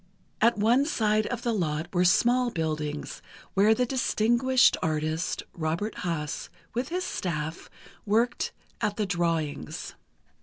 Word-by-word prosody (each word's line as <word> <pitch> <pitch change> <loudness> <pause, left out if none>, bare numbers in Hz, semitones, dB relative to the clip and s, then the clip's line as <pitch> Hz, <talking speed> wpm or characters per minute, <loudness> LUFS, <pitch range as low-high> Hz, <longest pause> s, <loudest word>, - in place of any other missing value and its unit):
At 230 +1 +4
one 235 +6 +4
side 215 -6 +1
of 245 -1 -4
the 235 - +1
lot 160 -5 -1
were 180 0 +3
small 240 +7 +4
buildings, 155 -5 -3 0.3
where 210 +3 +5
the 250 - +1
distinguished 245 0 +3
artist, 155 +2 -1
Robert 170 +6 -2
Haas, 160 -4 -3 0.2
with 245 +3 -2
his 365 +2 -1
staff, 160 - -3 0.3
worked 230 +4 +1 0.3
at 205 -1 0
the 215 - +1
drawings. 165 -5 -2
205 Hz, 125 wpm, -27 LUFS, 160-235 Hz, 0.3 s, where